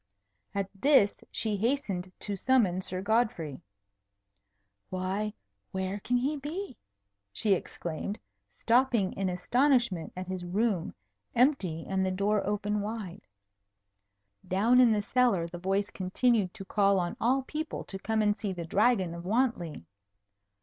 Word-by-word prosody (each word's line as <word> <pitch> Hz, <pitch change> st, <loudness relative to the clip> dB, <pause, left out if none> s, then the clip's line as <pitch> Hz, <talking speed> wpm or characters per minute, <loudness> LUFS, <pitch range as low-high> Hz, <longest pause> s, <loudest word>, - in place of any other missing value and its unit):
At 200 Hz, -1 st, 0 dB
this 205 Hz, -1 st, +4 dB
she 215 Hz, -2 st, -1 dB
hastened 200 Hz, -6 st, -1 dB
to 205 Hz, -, -2 dB
summon 195 Hz, -5 st, +2 dB
Sir 185 Hz, 0 st, -4 dB
Godfrey. 200 Hz, -, 0 dB, 1.3 s
"Why, 190 Hz, +3 st, -2 dB, 0.4 s
where 190 Hz, +1 st, -2 dB
can 245 Hz, +4 st, 0 dB
he 280 Hz, +5 st, 0 dB
be?" 305 Hz, +3 st, -5 dB, 0.6 s
she 205 Hz, -, +2 dB
exclaimed, 175 Hz, +2 st, -4 dB, 0.4 s
stopping 235 Hz, -5 st, +3 dB
in 195 Hz, -1 st, -1 dB
astonishment 235 Hz, -, +1 dB
at 185 Hz, -, -4 dB
his 185 Hz, -1 st, -4 dB
room, 190 Hz, 0 st, 0 dB, 0.4 s
empty 210 Hz, -, +2 dB
and 190 Hz, 0 st, 0 dB
the 190 Hz, -, +1 dB
door 200 Hz, +2 st, +1 dB
open 210 Hz, 0 st, 0 dB
wide. 205 Hz, -3 st, -6 dB, 1.2 s
Down 225 Hz, +7 st, +4 dB
in 245 Hz, -2 st, +7 dB
the 210 Hz, -1 st, +1 dB
cellar 240 Hz, -7 st, +2 dB
the 175 Hz, +1 st, -8 dB
voice 195 Hz, +3 st, 0 dB
continued 195 Hz, +1 st, +1 dB
to 195 Hz, -, -8 dB
call 200 Hz, 0 st, +3 dB
on 175 Hz, -1 st, -2 dB
all 260 Hz, +3 st, +2 dB
people 310 Hz, +4 st, -4 dB
to 195 Hz, -, -8 dB
come 220 Hz, +1 st, 0 dB
and 210 Hz, -1 st, +3 dB
see 205 Hz, -3 st, -3 dB
the 170 Hz, -2 st, -5 dB
Dragon 195 Hz, -1 st, +2 dB
of 170 Hz, 0 st, -7 dB
Wantley. 190 Hz, -, 0 dB
205 Hz, 135 wpm, -29 LUFS, 185-235 Hz, 1.3 s, in